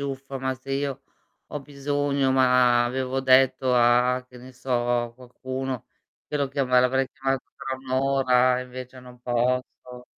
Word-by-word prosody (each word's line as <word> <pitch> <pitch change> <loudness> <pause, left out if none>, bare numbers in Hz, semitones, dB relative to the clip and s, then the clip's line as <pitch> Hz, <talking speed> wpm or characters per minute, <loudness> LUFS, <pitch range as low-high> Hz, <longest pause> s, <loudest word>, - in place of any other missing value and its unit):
"Uffa, 135 -1 -5
ma 130 0 -2
se 130 +1 -12
io 135 -1 -2 0.4
ho 150 - -6
bisogno, 140 -1 -1
ma 125 -2 +4
avevo 130 +1 -2
detto 130 0 +4
a 125 +1 +3
che 125 - -15
ne 130 +1 -13
so, 125 +1 -10 0.3
a 120 -1 -7
qualcuno, 130 0 -6 0.4
che 150 - -2
lo 140 -1 0
chiama 130 -2 +2
l'avrei 130 +1 +2
chiamato 135 -1 -2
tra 135 0 -4
1 130 0 -12
ora 130 -1 +3
e - - -4
invece 125 0 -10
non 125 -1 -14
posso." 125 0 -2
130 Hz, 160 wpm, -25 LUFS, 125-135 Hz, 0.4 s, ma